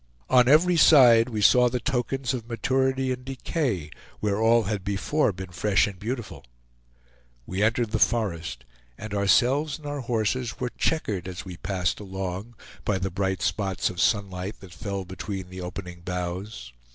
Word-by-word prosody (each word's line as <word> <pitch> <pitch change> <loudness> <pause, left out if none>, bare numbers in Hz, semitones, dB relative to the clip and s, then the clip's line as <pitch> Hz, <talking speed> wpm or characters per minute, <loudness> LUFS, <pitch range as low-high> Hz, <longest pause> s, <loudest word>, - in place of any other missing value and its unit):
On 125 -1 +6
every 170 +5 +5
side 125 -7 +7
we 110 -3 -2
saw 125 +4 +6
the 125 +1 -2
tokens 135 -1 -1
of 120 -2 -5
maturity 130 +2 0
and 125 0 -4
decay 130 - -2 0.3
where 105 0 0
all 115 +1 +4
had 100 -1 -3
before 105 +8 0
been 95 -1 -8
fresh 100 +3 +2
and 100 -3 -7
beautiful. 115 0 -5 1.0
We 95 +2 -3
entered 115 +1 +1
the - - 0
forest, 85 - 0 0.3
and 110 -2 -7
ourselves 125 - +2
and 155 - -15
our 145 0 -3
horses 120 0 -1
were 125 -1 -2
checkered, 105 - -1
as 90 0 -7
we 90 -2 -8
passed 90 -1 -2
along, 95 +3 -5 0.3
by 105 - 0
the 95 0 -3
bright 95 +1 -1
spots 95 -3 0
of 90 - -4
sunlight 100 -1 0
that 95 -3 -12
fell 100 -2 -4
between 95 0 -6
the 95 0 -7
opening 90 0 -7
boughs. 90 - -5
105 Hz, 165 wpm, -26 LUFS, 95-125 Hz, 1.0 s, side